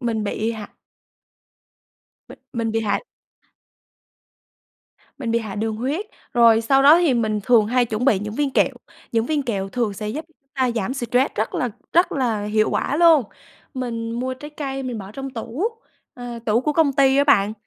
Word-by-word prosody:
mình 225 -4 -1
bị 220 +3 -2
hạ 215 -2 -8 1.6
Mình - - -12
mình 230 -2 -1
bị 225 - +1
hạ 205 -2 0 2.2
Mình 245 -5 -3
bị 230 - +2
hạ 215 -4 -6
đường 220 +1 -2
huyết. 285 - -2 0.3
Rồi 230 -2 +5
sau 270 +4 +3
đó 295 +4 +8
thì 335 -7 +3
mình 215 -3 0
thường 225 -1 +4
hay 250 +2 +2
chuẩn 220 +2 -2
bị 235 -8 +4
những 210 +2 -5
viên 290 +2 0
kẹo, - - +2 0.4
những 230 0 +1
viên 300 -2 0
kẹo 200 -6 -3
thường 230 -1 -1
sẽ 210 +2 -5
giúp 300 +8 -4
chúng 280 -3 -37
ta 260 -2 +1
giảm 230 +4 -2
stress 250 +1 0
rất 215 - -2
là 250 - -1 0.2
rất 345 +2 +3
là 230 -6 -1
hiệu 215 +1 +1
quả 285 - -1
luôn. 330 -3 +6 0.5
Mình 230 -3 -4
mua 255 +2 -3
trái 295 +4 -10
cây 270 -3 -5
mình 250 -3 -4
bỏ 195 0 -9
trong 270 +3 -6
tủ 240 - -4 0.5
ờ, 245 -1 -7
tủ 220 +2 +3
của 300 +3 -1
công 295 -2 +3
ty 270 0 +4
á 280 - +4
bạn. 210 -8 +3
240 Hz, 190 wpm, -22 LUFS, 220-270 Hz, 2.2 s, đó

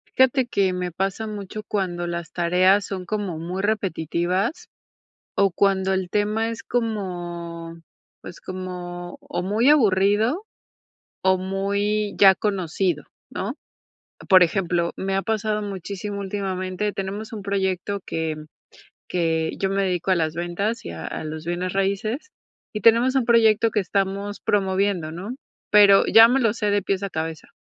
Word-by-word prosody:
Fíjate 260 -1 +4
que 195 -5 +1
me 180 -1 -3
pasa 195 +5 -2
mucho 210 0 -6
cuando 180 -4 -2
las 170 -2 -5
tareas 185 +3 +3
son 185 -2 -5
como 200 -5 -3
muy 180 +3 -4
repetitivas 190 - -1 0.7
o 195 -2 +3
cuando 190 0 +2
el 190 -2 -1
tema 215 +3 0
es 230 0 -6
como, 175 -7 -4 0.5
pues, - - -10
como 180 -1 -6
o 175 - -4
muy 220 +8 +2
aburrido 220 - +3 0.8
o 190 0 +3
muy 200 +2 -1
ya 195 -1 +7
conocido, 185 -5 -1 0.3
¿no? 220 +9 -4 0.7
Por 185 -1 +8
ejemplo, 175 -2 0
me 195 0 -2
ha 195 - +1
pasado 215 -1 -1
muchísimo 200 +1 -5
últimamente. 195 0 -3
Tenemos 200 +3 -5
un 210 - -5
proyecto 195 0 -1
que 160 -1 -2 0.7
que 165 -2 0
yo 195 -1 +1
me 195 0 +1
dedico 180 0 -1
a 185 - +4
las 160 -1 0
ventas 175 +7 -2
y - - -6
a 80 -1 -6
los 155 0 -6
bienes 175 +1 -2
raíces 205 - -2 0.4
y 210 - -4
tenemos 235 +5 +5
un 265 -3 +2
proyecto 230 -1 +4
que 215 - 0
estamos 200 +1 -1
promoviendo, 190 -4 0
¿no? 200 +9 -6 0.3
Pero 200 -1 +7
ya 225 +1 +9
me 260 +3 +2
lo 225 -3 +3
sé 210 -3 -1
de 205 0 +2
pies 195 0 -1
a 195 - -3
cabeza. 160 -1 -4
195 Hz, 150 wpm, -23 LUFS, 180-210 Hz, 0.8 s, ya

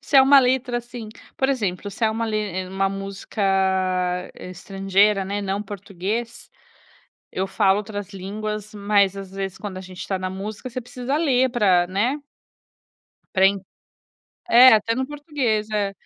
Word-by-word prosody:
Se 285 - +1
é 265 - +9
uma 275 +1 +7
letra, 250 -1 +2
assim 240 -2 -9 0.3
por 265 - +1
exemplo, 205 -6 -2
se 225 - -2
é 220 - +3
uma 225 +1 -2
le 215 -1 -1
eh, 185 -3 -3
uma 195 +1 0
música, 195 +2 -5 0.9
eh, 180 - -9
estrangeira, 195 +2 +1
né, 200 +2 -3
não 195 +1 -2
português, 205 +3 -5 0.8
eu 190 +1 -2
falo 190 +1 +3
outras 205 -1 -5
línguas, 210 +2 -5
mas 200 -1 +2
às 195 -1 -8
vezes, 195 -1 -5
quando 200 -3 -6
a - - -6
gente 185 -1 -11
está 190 - -2
na 185 0 -3
música, 205 +6 -6
você 250 +1 -5
precisa 245 +3 -4
ler 260 -5 +2
pra 190 -7 +3
né. 220 +10 0 1.2
Para 190 0 +6
en 200 +1 +2 0.9
é, 250 +2 +9
até 225 +2 +1
no 260 +2 -1
português, 280 -8 -2
é. 205 -2 0
205 Hz, 165 wpm, -23 LUFS, 195-240 Hz, 1.2 s, é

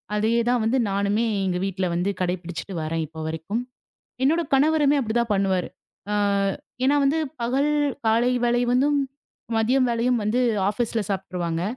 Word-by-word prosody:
அதையே 225 +3 +2
தான் 245 -1 +2
வந்து 245 +4 +2
நானுமே 200 +3 +1 0.2
எங்க 180 -1 0
வீட்ல 190 -1 -2
வந்து 180 +3 0
கடைப்பிடிச்சிட்டு 180 0 -3
வர்றேன் 160 +1 -2
இப்ப 160 +1 -9
வரைக்கும். 160 +9 -3 0.6
என்னோட 325 +5 +3
கணவருமே 295 +1 +3
அப்டி 220 -3 -3
தான் 230 -2 0
பண்ணுவாரு. 190 -2 0 0.4
அ - - +1 0.7
ஏனா 285 +2 +4
வந்து 290 +4 +2 0.2
பகல் 270 +5 +1 0.4
காலை 230 +3 +3
வேளை 240 0 +2
வந்தும், 285 +3 +3 0.6
மதியம் 255 +4 +3
வேளையும் 235 0 +1
வந்து 225 +4 +1 0.3
ஆஃபிஸ்ல 225 +2 -1
சாப்ட்டுருவாங்க. 180 -3 -2
220 Hz, 145 wpm, -24 LUFS, 185-250 Hz, 0.7 s, ஏனா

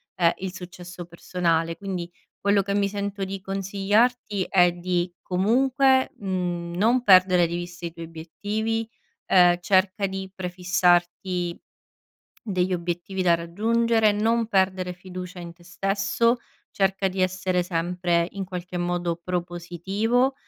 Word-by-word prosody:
ehm, 170 -2 +3
il 190 -1 -5
successo 180 -1 -9
personale. 165 -1 -1
Quindi, 180 -3 -5 0.3
quello 200 0 +3
che 200 +1 -2
mi 200 -1 +2
sento 200 0 -3
di 195 0 -6
consigliarti 200 +2 0
è 180 -2 +5
di, 175 0 -1
comunque, 260 +7 +2
mhmm, 175 -3 -3
non 235 +7 +3
perdere 185 -4 +6
di 170 - -4
vista 175 0 -6
i 170 - -5
tuoi 165 0 -7
obiettivi. 210 +8 -3 0.4
Ehm, 175 -2 +6
cerca 190 +2 +2
di 190 0 -5
prefissarti 180 -1 0 0.9
degli 185 -3 -1
obiettivi 175 +2 -3
da 175 -2 +4
raggiungere, 220 +6 +2
non 225 +2 +1
perdere 190 -3 +1
fiducia 180 0 -8
in 170 -1 -8
te 170 0 -21
stesso, 195 +6 +1 0.3
cerca 195 0 +1
di 190 0 -4
essere 185 -1 +1
sempre, 175 0 0
in 195 -1 -5
qualche 180 0 -5
modo, 175 -1 -1
propositivo, 180 +8 -1
185 Hz, 130 wpm, -25 LUFS, 175-200 Hz, 0.9 s, perdere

